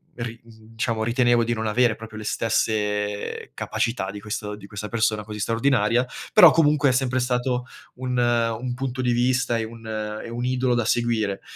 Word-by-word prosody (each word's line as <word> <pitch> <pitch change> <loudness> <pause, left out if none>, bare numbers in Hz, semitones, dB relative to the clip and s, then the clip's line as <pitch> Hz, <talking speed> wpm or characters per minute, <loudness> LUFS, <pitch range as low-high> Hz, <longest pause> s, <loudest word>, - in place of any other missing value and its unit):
ri 120 -1 -6
uhm, 115 - -17 0.2
diciamo 115 -1 -1
ritenevo 120 0 +3
di 120 +1 0
non 110 0 -3
avere 115 +1 +2
proprio 110 0 -10
le 110 - -6
stesse 105 -2 -1
capacità 115 -5 -2
di 105 - -8
questo 105 -1 -4
di 100 -1 -12
questa 100 +1 -6
persona 110 -2 0
così 105 0 -8
straordinaria. 115 +2 +2 0.3
Però - - +9
comunque 150 -3 +3
è - - +4
sempre 130 0 +1
stato 125 0 0 0.3
un 125 0 -3
un 120 0 +1
punto 130 0 -3
di 125 -1 +1
vista 125 0 +1
e 115 - -1
un 115 0 -9 0.4
e - - -8
un 120 +1 -3
idolo 125 -1 +1
da 120 -1 0
seguire. 115 -4 0
115 Hz, 180 wpm, -24 LUFS, 110-125 Hz, 0.4 s, Però